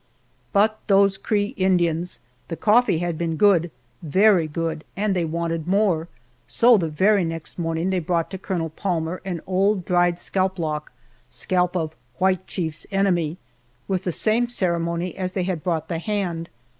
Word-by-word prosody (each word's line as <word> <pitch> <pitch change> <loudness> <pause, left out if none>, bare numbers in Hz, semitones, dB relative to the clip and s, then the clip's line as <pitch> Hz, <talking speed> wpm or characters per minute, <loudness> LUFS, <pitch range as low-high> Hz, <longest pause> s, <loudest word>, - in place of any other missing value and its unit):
But 215 +1 +3
those 195 -1 +4
Cree 205 0 0
Indians! 175 -4 +1 0.3
The 165 - -4
coffee 220 -4 +3
had 170 -1 -2
been 165 -1 -1
good, 175 -2 +4 0.3
very 185 +1 +4
good, 160 0 -3
and 205 -1 +1
they 175 -2 +1
wanted 165 0 -2
more, 185 -4 +2 0.4
so 240 +1 +5
the 170 -6 0
very 195 +6 +3
next 165 0 -5
morning 165 +2 -1
they 185 - +1
brought 170 +1 -1
to 190 - -5
Colonel 170 -4 -3
Palmer 170 -1 -2
an 175 -4 -3
old 190 0 +1
dried 175 -1 +2
scalp 190 +1 -1
lock, 155 -3 -3 0.4
scalp 180 +9 -1
of 160 -2 -3 0.2
"White 185 0 +1
Chief's 160 -4 -4
enemy," 180 -5 +1 0.5
with 190 -1 -1
the 180 - -1
same 225 +7 +1
ceremony 170 -4 -1
as 185 -1 -3
they 185 - -1
had 180 -3 -2
brought 160 -3 -1
the 165 -1 -3
hand. 175 -4 -2
180 Hz, 160 wpm, -23 LUFS, 165-195 Hz, 0.5 s, so